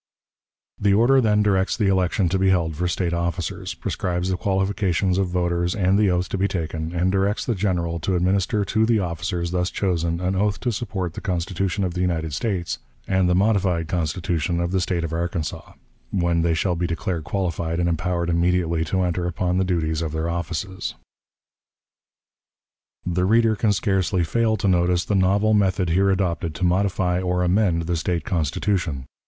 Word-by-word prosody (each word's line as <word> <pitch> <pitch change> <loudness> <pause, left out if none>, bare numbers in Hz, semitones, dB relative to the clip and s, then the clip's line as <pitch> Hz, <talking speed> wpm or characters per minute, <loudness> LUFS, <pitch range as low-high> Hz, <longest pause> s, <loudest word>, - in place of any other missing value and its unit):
The 100 -1 +3
order 130 +5 +5
then 105 -2 +3
directs 95 -2 +1
the 105 - +1
election 95 -1 +2
to 95 +2 0
be 95 0 +3
held 85 -4 +1
for 90 +4 -1
State 90 0 -1
officers, 85 -1 -3
prescribes 90 0 -2
the - - +1
qualifications 95 -1 0
of 95 - +1
voters 90 0 0
and 95 -2 +2
the 105 -2 +4
oath 90 0 0
to 100 - -3
be 100 - +2
taken, 80 -3 -3
and 90 +1 +1
directs 100 +2 0
the 120 - 0
General 90 -4 -1
to 90 +4 -1
administer 95 +3 +1
to 110 +3 +1
the 115 -1 +3
officers 85 -1 -2
thus 90 0 0
chosen 85 -3 -1
an 90 +1 -1
oath 100 +1 0
to 125 - 0
support 95 -6 -3
the - - -7
Constitution 95 +1 -1
of 90 -2 -1
the 90 - -2
United 80 -4 -1
States, 90 0 -2 0.3
and 95 -1 +2
the 90 - +3
"modified 95 -4 +2
Constitution 85 0 -1
of 85 0 -1
the 95 -1 +1
State 85 -1 -1
of 80 -1 -3
Arkansas," 85 -1 -3 0.4
when 85 -3 +1
they 85 0 +1
shall 90 +2 0
be 85 +1 -1
declared 85 0 -3
qualified 85 0 -2
and 85 - +1
empowered 85 0 -1
immediately 85 -1 +1
to 95 +3 0
enter 90 0 -1
upon 90 +1 -1
the - - +3
duties 80 -3 -1
of 80 -2 -3
their 80 +1 -1
offices. 85 +2 -4 2.1
The 90 +1 0
reader 115 +2 +3
can 105 +1 +1
scarcely 95 -3 +1
fail 110 +5 +1
to 100 - -1
notice 90 -1 +2
the - - -1
novel 100 +3 +3
method 95 -4 +2
here 95 +3 +3
adopted 85 -4 -1
to 80 - -5
modify 90 -1 +1
or 90 0 0
amend 90 -2 +2
the 85 +1 -1
State 80 -1 -2
Constitution. 80 -2 -1
90 Hz, 180 wpm, -23 LUFS, 85-95 Hz, 2.1 s, order